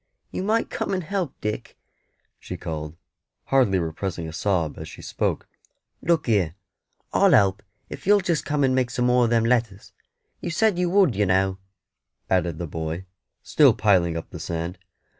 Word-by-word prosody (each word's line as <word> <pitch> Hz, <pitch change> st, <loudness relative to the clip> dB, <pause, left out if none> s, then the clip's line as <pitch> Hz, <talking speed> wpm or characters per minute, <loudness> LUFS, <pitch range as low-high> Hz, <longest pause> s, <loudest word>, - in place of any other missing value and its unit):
"You -, -, -3 dB
might 220 Hz, +4 st, 0 dB
come 200 Hz, -, -2 dB
and 185 Hz, -, -2 dB
help, 185 Hz, -4 st, -3 dB
Dick," 105 Hz, 0 st, -4 dB, 0.6 s
she -, -, -7 dB
called, 75 Hz, 0 st, -6 dB, 0.5 s
hardly 125 Hz, -8 st, +3 dB
repressing 85 Hz, 0 st, -3 dB
a 80 Hz, -, -8 dB
sob 85 Hz, -3 st, -1 dB
as -, -, -7 dB
she -, -, -12 dB
spoke. -, -, -2 dB, 0.5 s
"Look 170 Hz, -2 st, +1 dB
here, 95 Hz, -8 st, +1 dB, 0.6 s
I'll -, -, +5 dB
help 100 Hz, -1 st, +4 dB, 0.3 s
if -, -, -9 dB
you'll 205 Hz, 0 st, +6 dB
just 175 Hz, -4 st, 0 dB
come 145 Hz, -1 st, 0 dB
and 130 Hz, -1 st, +3 dB
make 130 Hz, -1 st, +1 dB
some 125 Hz, -1 st, -1 dB
more 125 Hz, 0 st, +4 dB
of -, -, 0 dB
them 115 Hz, -1 st, +2 dB
letters. 115 Hz, -5 st, 0 dB, 0.5 s
You -, -, -4 dB
said 195 Hz, +2 st, +2 dB
you 180 Hz, -1 st, +1 dB
would, 185 Hz, -, +4 dB
you 105 Hz, 0 st, +1 dB
know," 95 Hz, 0 st, +1 dB, 0.7 s
added 85 Hz, -3 st, +1 dB
the 85 Hz, -, -4 dB
boy, 80 Hz, +3 st, -4 dB, 0.4 s
still -, -, +5 dB
piling 90 Hz, -6 st, +2 dB
up 80 Hz, -, -7 dB
the -, -, -8 dB
sand. 85 Hz, +2 st, -4 dB
105 Hz, 175 wpm, -24 LUFS, 85-140 Hz, 0.7 s, you'll